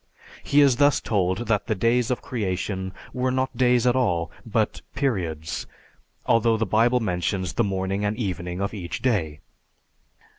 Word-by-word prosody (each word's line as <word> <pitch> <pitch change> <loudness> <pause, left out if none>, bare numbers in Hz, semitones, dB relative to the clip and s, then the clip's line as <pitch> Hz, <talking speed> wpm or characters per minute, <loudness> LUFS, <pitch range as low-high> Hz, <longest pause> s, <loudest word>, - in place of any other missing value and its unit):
He 145 +1 +4
is 135 -4 +5
thus 145 0 +4
told 95 +1 0
that 105 -3 +1
the 110 - 0
days 115 +4 +2
of 125 - -2
creation 95 -4 -3 0.2
were 130 0 0
not 130 +1 -1
days 125 -1 +3
at 125 0 +3
all, 90 -10 +1 0.2
but 110 0 0
periods; 90 - -2 0.6
although 115 0 +3
the 110 - 0
Bible 115 +5 +3
mentions 95 -2 -1
the 115 - +1
morning 95 0 -1
and 105 +1 -1
evening 90 -4 -3
of 100 +2 -2
each 90 -2 -5
day. 85 - 0
110 Hz, 155 wpm, -24 LUFS, 95-125 Hz, 0.6 s, is